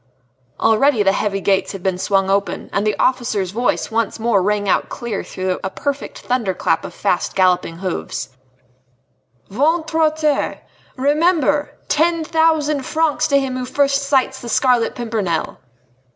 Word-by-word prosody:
Already 225 +1 +3
the 195 - +4
heavy 195 0 -1
gates 195 +1 +1
had 195 -2 -8
been 185 -2 -1
swung 195 0 +1
open, 195 -2 -1
and 200 +2 0
the 210 - 0
officer's 220 -8 0
voice 240 +2 -1
once 225 -1 -1
more 220 -3 +2
rang 205 +1 0
out - - +1
clear 235 -5 -4
through 185 0 -3
a 190 - -1
perfect 285 +6 -4
thunder 235 -7 -1
clap 190 - 0
of - - -7
fast - - -1
galloping 180 -3 +2
hoofs: 185 -5 -4 1.2
"Ventre 320 - +1
a 315 - +5
terre! 305 -2 -1 0.4
Remember! 295 0 +1
ten 330 +1 +2
thousand 315 -2 +2
francs 310 +3 0
to 280 -1 +3
him 265 -2 -3
who 255 - -3
first 275 +1 +1
sights 265 -1 +1
the 235 - -7
Scarlet 245 -1 +2
Pimpernel!" 215 -9 -2
240 Hz, 150 wpm, -19 LUFS, 195-290 Hz, 1.2 s, a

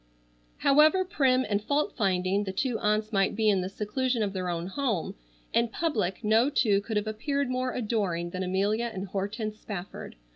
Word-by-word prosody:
However 310 +7 +5
prim 260 -7 +2
and 205 -1 0
fault 290 +5 0
finding 190 -1 +1
the 190 - -3
two 230 +4 -1
aunts 215 +1 0
might 195 0 +2
be 215 0 +3
in 195 -2 +1
the 185 - -3
seclusion 225 +4 -1
of 200 -2 -2
their 185 -2 -2
own 170 -1 -2
home, 220 - -2 0.4
in 235 0 +3
public 225 - -2
no 220 +5 +4
two 210 -8 +2
could 215 +1 -3
have 210 - 0
appeared 255 +5 -2
more 255 0 -1
adoring 200 -8 -1
than 185 - -4
Amelia 200 +5 0
and 195 -2 -6
Hortense 215 +3 -3
Spafford. 195 -2 -7
215 Hz, 180 wpm, -28 LUFS, 195-250 Hz, 0.4 s, However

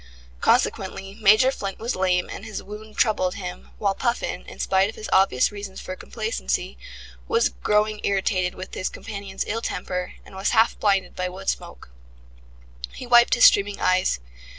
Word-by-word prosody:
Consequently 195 - +1
Major 215 +6 +6
Flint 195 -7 -5
was 235 +3 -3
lame 185 -1 +1
and - - -8
his 220 -2 -6
wound 210 +1 -10
troubled 185 -5 +2
him, 180 -3 -7
while 200 -2 +1
Puffin, 235 +3 -2
in - - -10
spite 190 +1 +2
of 220 - -8
his 215 - -7
obvious 190 -8 +4
reasons 200 -2 -7
for 185 - -6
complacency, 445 - -3 0.5
was 460 +1 +3
growing 210 0 0
irritated 190 -2 0
with 185 0 -8
his 185 - -2
companion's 200 -3 -6
ill 225 +2 -2
temper, 180 -5 -4
and - - -15
was 190 +1 0
half 225 +1 +4
blinded 195 -2 +1
by 180 0 -2
wood 185 +2 -4
smoke. - - -5 1.0
He - - -8
wiped 240 -1 +6
his 245 - +6
streaming 200 0 +5
eyes. 185 - +2
200 Hz, 165 wpm, -24 LUFS, 185-215 Hz, 1.0 s, Major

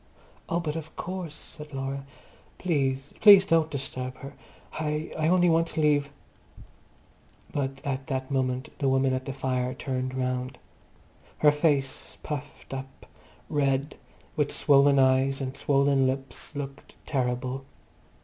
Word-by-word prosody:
"Oh, 170 - +1
but 155 -3 -3
of 160 -1 -7
course!" 180 -4 -5
said 150 -2 -11
Laura. 135 +1 -3 0.5
"Please, 135 -5 -1
please 200 -3 +9
don't 165 -1 +3
disturb 130 -2 -5
her. 135 - -9 0.5
I—I 155 0 -1
only 180 +1 +4
want 165 0 +3
to 160 - -5
leave—" 145 -2 +3 1.4
But 135 -1 -2
at 135 -1 -2
that 130 -1 -3
moment 130 -1 0
the 140 -2 +2
woman 135 0 +3
at 130 0 -2
the 135 - -3
fire 130 -1 -1
turned 130 -1 -3
round. 125 0 -2 0.8
Her 150 - +6
face, 145 -3 0
puffed 145 -2 -6
up, 135 0 -8 0.4
red, 140 0 0 0.4
with 150 -3 +1
swollen 140 -1 +5
eyes 135 +1 +3
and 135 -1 -4
swollen 140 -1 +3
lips, 135 +2 -3
looked 140 -1 -7
terrible. 125 0 -1
135 Hz, 130 wpm, -27 LUFS, 130-150 Hz, 1.4 s, please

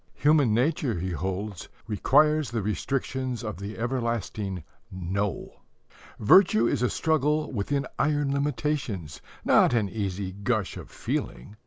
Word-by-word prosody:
Human 145 -5 +4
nature, 125 - +1
he 95 +2 -3
holds, 95 +3 -4 0.2
requires 150 +7 +3
the 115 -4 -2
restrictions 130 +3 -2
of 105 -2 -4
the 100 +3 -7
everlasting 115 - -2 0.3
"No." 95 +2 -3 0.6
Virtue 115 - +5
is - - +1
a 125 - +2
struggle 155 -1 +1
within 135 +5 -1
iron 145 0 +1
limitations, 135 - -2 0.2
not - - +5
an 110 -3 +2
easy 95 -1 -3
gush 100 +1 -1
of - - -9
feeling. 65 +12 -4
115 Hz, 125 wpm, -27 LUFS, 100-140 Hz, 0.6 s, Virtue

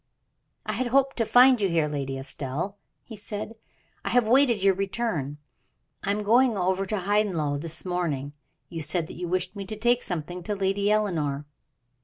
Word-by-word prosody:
"I - - -2
had 255 - -1
hoped 270 +2 +2
to 230 -2 0
find 250 -1 +6
you 195 - +2
here, 165 -3 +2
Lady 135 -2 -3
Estelle," 140 +7 -3 0.3
he 225 - -10
said. 210 +1 -6 0.5
"I - - -2
have 245 -3 +3
waited 240 -4 +4
your 195 -1 +5
return. 190 - -2 0.7
I - - -2
am 210 +1 0
going 235 +1 +4
over 190 +1 0
to 210 +1 -1
Hyndlow 180 -8 0
this 165 +2 +2
morning, 175 -7 -1
and 145 +1 -9 0.4
you 165 - -3
said 155 +3 0
that - - -10
you 175 0 -4
wished 185 +2 -1
me 200 - -5
to 215 - -4
take 240 +3 +2
something 175 +1 -4
to 205 +4 -3
Lady 200 +1 0
Eleanor." 160 -10 0
195 Hz, 185 wpm, -26 LUFS, 160-215 Hz, 0.7 s, find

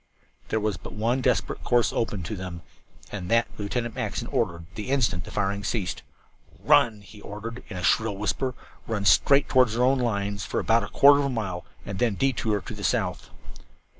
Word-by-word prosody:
There 110 - 0
was 105 -1 -1
but - - -10
one 115 +5 0
desperate - - 0
course 120 -1 +2
open 105 -5 -2
to 105 +5 -4
them, 90 -2 -7 0.5
and 90 -4 -5
that 115 0 +3
Lieutenant 115 +3 -2
Mackinson - - -3
ordered 85 -1 -1
at 95 - -26
the 105 +5 -6
instant 115 -10 +1
the - - -9
firing 100 0 -1
ceased. 100 -2 -2 0.6
"Run!" 110 -3 +3
he 105 +1 -14
ordered, 115 +5 -7
in 95 - -6
a 90 - -5
shrill 105 +1 +2
whisper. 125 +5 -1 0.3
"Run 105 -3 -2
straight 140 +11 +5
toward 130 -3 +4
our 120 - +2
own 130 +1 +3
lines 100 -4 -1
for - - -2
about 115 +1 +3
a - - -4
quarter 140 0 +6
of 140 - +1
a - - 0
mile 100 -8 -3 0.2
and 100 -2 -5
then 115 -4 +2
detour 110 -5 0
to - - -8
the - - -8
south." - - -1
110 Hz, 195 wpm, -26 LUFS, 100-120 Hz, 0.6 s, quarter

